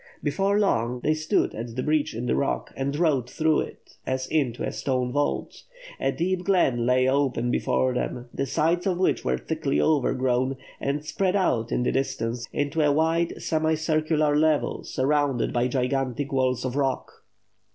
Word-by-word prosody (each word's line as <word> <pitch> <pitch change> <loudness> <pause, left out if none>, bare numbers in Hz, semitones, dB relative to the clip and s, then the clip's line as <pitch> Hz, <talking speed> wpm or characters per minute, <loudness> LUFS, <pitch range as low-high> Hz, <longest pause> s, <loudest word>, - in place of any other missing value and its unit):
Before 195 +7 +1
long, 125 - +1
they 155 - +2
stood 155 0 0
at 115 +1 -6
the 130 - -2
breach 150 -5 0
in 120 +2 -3
the - - +1
rock 140 - -1
and 140 +1 -2
rode 145 -7 +1
through 155 +2 +2
it, - - -8
as 130 0 -2
into 130 -7 -1
a - - -2
stone 125 -2 -1
vault. 145 +2 -2 0.4
A - - +1
deep 180 +2 -1
glen 135 -12 +2
lay 130 0 +3
open 130 -3 +1
before 130 +1 +1
them, 125 0 -3
the 135 - -2
sides 165 +7 +1
of 180 -2 +1
which 185 - +1
were 65 0 0
thickly 70 - -1
overgrown, 130 - +1 0.2
and 145 +2 -2
spread 185 +4 0
out 120 - +1
in 125 - +1
the - - +1
distance 125 -3 -2
into 145 +2 -1
a 150 -1 +4
wide 165 +3 +1
semicircular 155 -1 +1
level 155 0 +1
sur 130 - -2
rounded 145 -4 +1
by 120 +1 +2
gigantic 130 +1 -1
walls 130 -2 +1
of 130 0 -3
rock. 135 -2 -1
140 Hz, 170 wpm, -25 LUFS, 125-155 Hz, 0.4 s, a